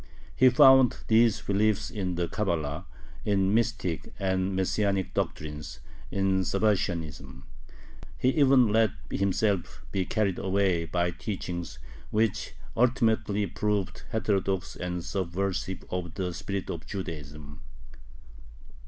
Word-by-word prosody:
He 130 - +6
found 130 0 +6
these 110 -1 +4
beliefs 105 +2 +1
in 95 -6 -2
the 85 0 -1
Cabala, 85 -5 -2 0.4
in 100 -1 +2
mystic 90 -8 -1
and 95 -1 0
Messianic 95 0 0
doctrines, 75 0 -4 0.3
in 95 -1 +1
Sabbatianism. 85 -10 -1 0.7
He 125 - +2
even 135 -4 +5
let 110 0 +3 0.2
himself 100 -1 0
be 95 -2 0
carried 100 -5 0
away 95 -3 +1
by 85 +1 0
teachings 85 - -5 0.3
which 110 -1 0 0.2
ultimately 110 -4 +2
proved 100 +1 -2
heterodox 100 -4 -1
and 90 -1 -4
subversive 95 0 -2
of 90 -2 -4
the 90 -2 -2
spirit 100 +2 -4
of 85 - -7
Judaism. 75 -6 -7
95 Hz, 110 wpm, -28 LUFS, 85-105 Hz, 0.7 s, He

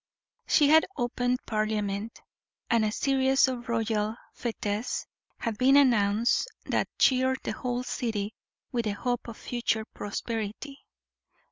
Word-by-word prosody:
She 290 -3 +5
had 320 +1 +6
opened 245 +1 -1
Parliament, 215 0 -2 0.5
and 230 -1 +4
a 215 - +1
series 265 +2 +3
of 245 -2 -4
royal 220 -2 0 0.2
fetes 220 -1 -3 0.3
had 220 -2 -3
been 270 +2 +6
announced 235 - +3 0.2
that - - 0
cheered 260 0 +3
the - - -2
whole 250 0 -2
city 220 -4 -2 0.4
with 235 -2 -1
the 210 - 0
hope 245 +4 -2
of 230 - -8
future 230 -2 -1
prosperity. 225 +6 -5
235 Hz, 125 wpm, -28 LUFS, 215-255 Hz, 0.5 s, had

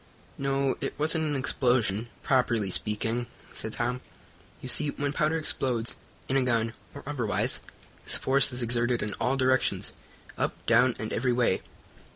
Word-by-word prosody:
"No, 135 -1 0
it - - -3
wasn't 160 +1 +2
an 150 -1 -1
explosion, 120 -5 +1
properly 120 -7 +1
speaking," 115 +4 0 0.3
said 110 - -2
Tom. 125 +1 -2 0.6
"You - - -8
see, 150 +3 +5
when 145 0 -2
powder 155 +2 +1
explodes, 125 -7 0 0.3
in 135 - +1
a - - +3
gun, 115 -3 +1 0.2
or - - -8
otherwise, 125 -7 +1 0.4
its - - -1
force 135 +1 +4
is 125 0 -1
exerted 120 +1 +1
in 105 -1 -3
all 135 +2 +1
directions, 130 -1 +1 0.5
up, - - 0
down 120 +1 +4
and 110 - -4
every 125 +1 +1
way." 120 -6 +2
125 Hz, 155 wpm, -28 LUFS, 115-135 Hz, 0.6 s, see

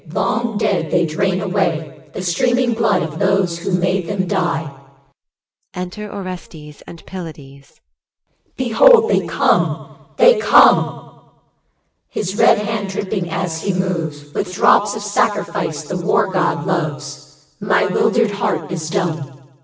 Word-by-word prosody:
Long 230 +5 -1
dead, 195 -7 0
they 175 +1 +2
drain 185 +4 -1
away 170 -7 -2
The 185 - -5
streaming 240 +8 +1
blood 225 -4 +1
of 160 -1 -6
those 195 -3 +1
who 185 - -4
made 180 0 0
them 195 -2 -1
die. 170 -6 -2 1.0
Enter 185 +4 -6
ORESTES 175 -6 -9
and 170 - -12
PYLADES. 145 -7 -11 0.8
Behold, 445 - +5
they - - +1
come, - - 0 0.2
they 485 -2 +6
come! - - +3 0.9
His 190 -1 -4
red - - +5
hand 210 -1 -3
dripping 190 -2 -3
as 165 -2 -3
he 195 - -1
moves 160 -6 -3
With 180 - -3
drops 205 +1 +4
of 215 - -6
sacrifice 170 -6 -1
the 180 +5 -4
War 195 +1 +2
god 180 -2 0
loves. 150 -3 -5
My 205 0 +2
'wildered 220 +3 +1
heart 200 - -2
is 160 -3 -4
dumb. 175 -4 -1
EL. 135 -1 -12
185 Hz, 135 wpm, -18 LUFS, 160-205 Hz, 1.0 s, they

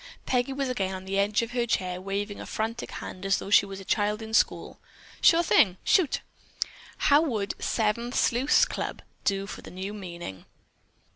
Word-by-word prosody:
Peggy 250 +1 +1
was 270 0 -1
again 195 -7 -1
on 185 0 -8
the 195 +1 -1
edge 210 +3 +2
of 230 - -5
her 240 -1 0
chair 185 -4 -1
waving 200 +2 -3
a - - -8
frantic 225 +2 -3
hand 185 - -7
as 195 0 +2
though 200 - -6
she 200 - +6
were 195 - -7
a 195 - -8
child 210 +1 +1
in 220 0 -8
school. - - +1 0.4
"Sure 335 +1 +6
thing! 190 - +4
Shoot!" 360 -8 +3 0.8
"How 290 +1 +5
would 220 -10 -1
'Seven 230 +2 0
Sleuths' 255 - +3
Club' - - -5 0.2
do 195 -1 +1
for 200 - -8
the - - -10
new 190 +3 -5
meaning?" 175 - -8
210 Hz, 185 wpm, -27 LUFS, 195-240 Hz, 0.8 s, she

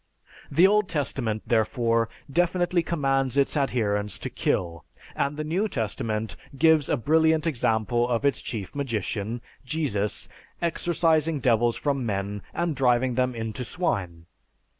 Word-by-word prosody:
The 165 +6 +5
Old 210 0 +3
Testament, 130 -8 -1
therefore, 115 0 +1 0.2
definitely 175 +3 +1
commands 135 -5 0
its 140 +2 +2
adherents 105 -7 0
to - - -6
kill, 85 -3 -1 0.3
and 140 +1 -1
the 155 - -2
New 175 +8 0
Testament 110 - -2 0.2
gives 160 -1 +4
a - - +2
brilliant 160 +4 +3
example 120 -4 +1
of 120 +3 0
its 140 - +1
chief 105 -5 -5
magician, 115 -4 -3 0.2
Jesus, 125 - -1 0.3
exorcising 165 -2 +1
devils 120 -2 +2
from 140 -3 -1
men 100 -2 -2
and 170 -3 -1
driving 125 -1 +2
them 125 0 0
into 115 +2 -4
swine. 90 - -2
130 Hz, 130 wpm, -26 LUFS, 110-155 Hz, 0.3 s, The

